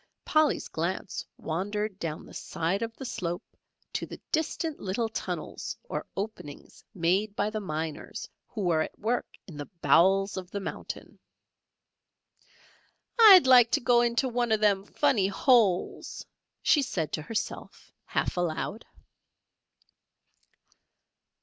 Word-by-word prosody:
Polly's 310 -1 +2
glance 175 +3 -3
wandered 200 +4 -3
down 160 -2 -4
the - - -14
side 170 +6 -2
of 230 0 -4
the 265 - -7
slope 175 -7 -3 0.5
to - - -3
the - - -9
distant 320 0 -1
little 205 +4 -1
tunnels 220 - -5
or - - -5
openings 195 -8 -7
made 190 +4 +1
by 210 - 0
the 215 - -2
miners 160 -5 -5 0.2
who 220 - -6
were 170 -4 +2
at - - -4
work 235 +3 -1 0.2
in 165 -6 -11
the 145 - -7
bowels 195 +3 +4
of 185 -1 -6
the 200 - -4
mountain. 195 - -7 2.0
"I'd 395 -8 +10
like 250 -3 +7
to - - +4
go 240 -1 +4
into 240 +2 +1
one 240 -1 0
of 220 - +3
them 200 -2 +2
funny 205 -2 +2
holes," 200 -3 +2 0.4
she 295 - +5
said 170 - -2
to - - -1
herself, 215 +8 -5
half - - -1
aloud. 175 +5 -2
205 Hz, 130 wpm, -28 LUFS, 175-235 Hz, 2.0 s, I'd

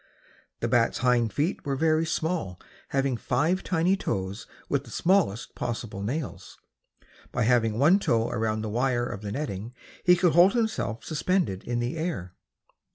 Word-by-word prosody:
The - - 0
bat's - - +2
hind 120 -3 +3
feet 150 - -1
were 140 -2 -1
very 160 +2 +2
small, 160 - -2 0.3
having 135 -2 0
five 155 +12 0
tiny 180 +1 +2
toes 95 - -3 0.2
with - - 0
the - - -14
smallest 170 - +1
possible 115 -4 -4
nails. 130 +8 -5 0.7
By 120 - 0
having 115 -2 +2
one 160 - +5
toe 115 - +1
around 110 -2 -1
the 110 - -3
wire 120 +2 +1
of 120 -4 -5
the 105 -1 -5
netting 115 -3 -4 0.3
he 180 0 +6
could 175 -2 +2
hold 175 +3 +6
himself 220 - -1
suspended 160 - -1
in 120 0 -2
the 120 +7 -2
air. 130 - -3
125 Hz, 160 wpm, -27 LUFS, 110-165 Hz, 0.7 s, he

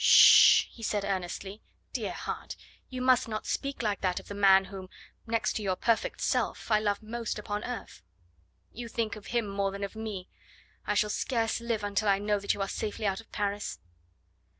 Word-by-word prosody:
"Sh - - +4
sh - - +10
sh!" - - +8
he 230 - -14
said 205 -2 -1
earnestly. 195 +2 -4 0.3
"Dear - - -2
heart, - - -5 0.3
you 255 -1 -4
must 255 -2 +4
not 215 -1 -4
speak 275 -3 -3
like 205 -2 -1
that 185 -2 0
of - - -15
the - - -5
man 195 -1 +5
whom, 190 -1 -9 0.4
next 230 +1 0
to - - -3
your 190 -3 0
perfect 230 +4 0
self, - - -1
I 215 - +5
love 205 -1 -1
most 230 0 -4
upon 210 0 -4
earth." 245 - -6 0.7
"You 235 0 -7
think 230 -1 -2
of 215 - -11
him 235 -3 0
more 200 0 -1
than 200 +1 -6
of 200 - -5
me. 215 -4 -5 0.6
I 210 - +1
shall 210 +1 +2
scarce 230 -2 -1
live 230 -3 -2
until 205 +1 0
I 195 - +4
know 205 +1 0
that 200 - 0
you 200 - -5
are - - -3
safely 215 +2 -4
out 195 +1 0
of 225 - -25
Paris." 205 0 -2
210 Hz, 205 wpm, -29 LUFS, 200-225 Hz, 0.7 s, sh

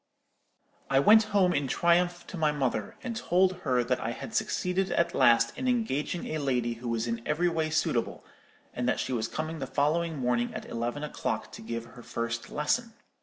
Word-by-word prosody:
"I 135 - +4
went 215 +9 +7
home 195 -4 +3
in 140 -1 0
triumph 175 +4 +2
to - - -8
my 155 -3 +2
mother, 130 -8 -2
and 240 -3 -4
told 185 -4 +2
her 130 -8 +1
that 125 +1 0
I 115 - -2
had 225 - -8
succeeded 185 -2 0
at 170 0 +1
last 115 -1 +4
in 260 0 -3
engaging 200 - 0
a 155 - -2
lady 125 -4 0
who 120 +1 -6
was 115 0 0
in 115 -1 -2
every 170 +6 +1
way 160 -2 -1
suitable, 155 - -1 0.5
and 125 0 -1
that - - 0
she 130 - -2
was 115 -2 0
coming 155 +1 -4
the 135 - -4
following 150 +4 0
morning 120 -2 0
at - - -5
eleven 120 +5 -3
o'clock 150 - -3
to - - -10
give 115 +1 -5
her 120 +1 -13
first 115 0 -4
lesson. 225 +11 -1
150 Hz, 195 wpm, -29 LUFS, 120-175 Hz, 0.5 s, went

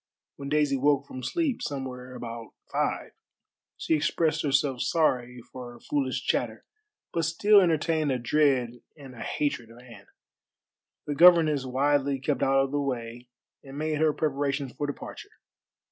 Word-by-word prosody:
When 140 -1 -6
Daisy 145 -2 +2
woke 140 +1 +2
from 130 - -8
sleep 310 - -1
somewhere 130 -2 -5
about 115 -2 -8 0.2
five - - -1 0.7
she - - -1
expressed 160 +1 +1
herself 140 -3 +1
sorry 125 -4 0
for 125 -2 -8
her 120 - -14
foolish 135 -1 -2
chatter, - - -1 0.5
but 165 - 0
still 200 +6 +5
entertained 160 -3 +1
a 130 - +1
dread 125 -2 +1 0.2
and 135 -3 -11
a 120 - -11
hatred 140 -6 -2
of 115 - -15
Anne. 120 -5 -14 1.0
The 145 - -2
governess 155 -3 +6
wisely 140 +1 +1
kept 135 0 -1
out 135 0 +3
of 135 - -4
the 145 0 0
way 120 -2 -4 0.4
and 135 0 -10
made 155 0 -1
her 160 -1 +4
preparations 140 -3 -2
for 145 - -3
departure. 145 - -8
140 Hz, 150 wpm, -27 LUFS, 125-150 Hz, 1.0 s, governess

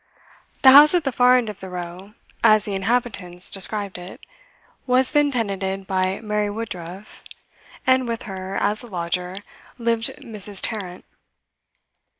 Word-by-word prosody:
The 265 - +10
house 295 +5 +9
at 350 - +2
the 270 - -1
far 250 +1 +5
end 245 -3 -1
of 210 -2 -7
the 190 - -8
row 180 +3 -8 0.3
(as 215 -2 +5
the 205 - -4
inhabitants 195 -4 -2
described 200 -1 -4
it) 180 +1 -10 0.7
was 255 +1 +3
then 295 -1 +3
tenanted 195 -6 -2
by 185 0 -1
Mary 210 -1 -1
Woodruff, 200 -3 -7 0.6
and 260 -1 +3
with 230 -1 -3
her, 190 -1 -6
as 210 +1 0
a 240 - -8
lodger, 180 -1 -3 0.4
lived 230 -1 0
Mrs. 210 -7 -6
Tarrant. 185 -5 -3
210 Hz, 145 wpm, -22 LUFS, 190-235 Hz, 0.7 s, The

